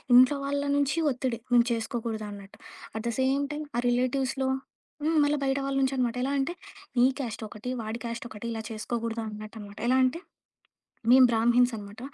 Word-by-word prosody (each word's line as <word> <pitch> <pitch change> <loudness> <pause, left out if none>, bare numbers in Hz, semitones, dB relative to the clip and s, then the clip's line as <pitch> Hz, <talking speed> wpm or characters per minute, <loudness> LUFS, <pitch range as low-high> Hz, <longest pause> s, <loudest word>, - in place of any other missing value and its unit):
ఇంట్లో 255 +3 +7
వాళ్ళ 285 0 0
నుంచి 285 +2 +1
ఒత్తిడి 250 -2 -2
మేము 240 -1 +6
చేసుకోకూడదన్నట్టు. 220 -3 -4 0.4
అట్ 220 - -5
ద - - 0
సేమ్ 275 +2 +2
టైం 300 +1 -4
ఆ - - +3
రిలేటివ్స్‌లో 260 +2 0 0.5
హ్మ్. 320 +2 +2
మళ్ళా 290 +1 +2
బయట 270 0 +1
వాళ్ళ 275 0 -1
నుంచి 265 0 +2
అనమాట. 245 -2 0
ఎలా 275 - 0
అంటే 275 +6 0 0.4
"నీ 245 - +6
క్యాస్ట్ 230 -4 -4
ఒకటి, 215 +4 -7
వాడి 220 +2 -4
క్యాస్ట్ 235 0 -4
ఒకటి 215 -1 -9
ఇలా 225 -1 -3
చేసుకోకూడదు." 230 +1 -3
అన్నట్టనమాట. 210 -1 -9
ఎలా 255 - +4
అంటే? 260 +6 +1 0.9
మేమ 260 0 +9
బ్రాహ్మిణ్స్ 240 +2 +4
అనమాట. 205 +1 -9
240 Hz, 170 wpm, -28 LUFS, 225-265 Hz, 0.9 s, మేమ